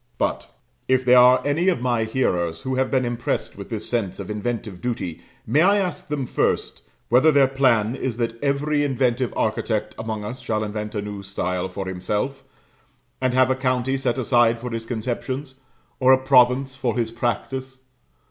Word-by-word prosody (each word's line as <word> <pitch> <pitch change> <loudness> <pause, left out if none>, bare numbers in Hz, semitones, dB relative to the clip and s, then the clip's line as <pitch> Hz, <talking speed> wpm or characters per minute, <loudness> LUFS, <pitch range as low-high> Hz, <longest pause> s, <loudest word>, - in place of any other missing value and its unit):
But, - - -2 0.4
if 130 -1 +2
there 125 0 +7
are 125 +1 +6
any 155 +6 +1
of 175 - 0
my 120 -2 0
hearers 90 -9 -1
who 130 - -3
have 130 0 +1
been 130 -2 +1
impressed 120 0 -2
with - - -9
this - - -5
sense 105 -7 -2
of 100 +1 -5
inventive 105 -3 -4
duty, 115 -9 -3 0.2
may 150 - +3
I 200 +4 +5
ask 185 -3 -2
them 145 -3 -2
first, - - -1 0.3
whether 130 +7 +5
their 140 -2 +5
plan 125 -4 +2
is 130 -3 -3
that 115 -1 -3
every 145 +1 +1
inventive 130 -3 0
architect 110 0 -1
among 110 -2 -4
us 120 +4 -6
shall 110 -3 -2
invent 105 0 -5
a 105 - -2
new 105 -1 -6
style 95 -2 -3
for 95 - -5
himself, 105 +9 -3 0.8
and 130 -1 +1
have 130 0 +4
a - - +2
county 130 0 0
set 130 -2 -1
aside 120 -2 +3
for 125 +1 -6
his 115 0 -5
conceptions, 130 +4 -4 0.4
or 130 0 +5
a - - +6
province 130 0 +4
for 125 -4 -2
his 115 -2 -1
practice? 130 +3 -3
125 Hz, 180 wpm, -23 LUFS, 110-130 Hz, 0.8 s, there